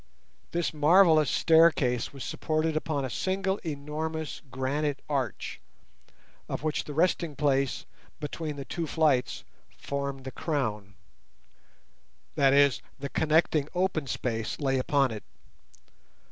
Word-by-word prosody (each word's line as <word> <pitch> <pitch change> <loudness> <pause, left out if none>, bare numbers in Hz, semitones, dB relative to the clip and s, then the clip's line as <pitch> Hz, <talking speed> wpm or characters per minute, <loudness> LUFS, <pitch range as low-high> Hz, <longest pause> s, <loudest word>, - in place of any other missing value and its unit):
This 170 -1 -1
marvellous 155 0 +5
staircase 155 -7 +3
was 135 -3 -8
supported 155 0 -1
upon 155 -3 -1
a - - -4
single 190 - -1
enormous 155 +1 -4
granite 135 +3 -1
arch, 135 -7 -3 0.9
of - - -4
which 155 -1 -1
the 145 - -7
resting 170 -2 +1
place 140 -2 0 0.3
between 150 0 -4
the 140 -1 -7
two 165 +3 -3
flights 150 -5 +1 0.3
formed 140 -1 -4
the 130 - -6
crown; 110 - -3 1.4
that 135 -1 +4
is, 140 -1 +4 0.2
the 140 0 -5
connecting 155 -2 +2
open 180 -5 0
space 115 -3 -3
lay 135 -3 +1
upon 135 0 +2
it. 110 -2 -6
145 Hz, 120 wpm, -28 LUFS, 135-160 Hz, 1.4 s, marvellous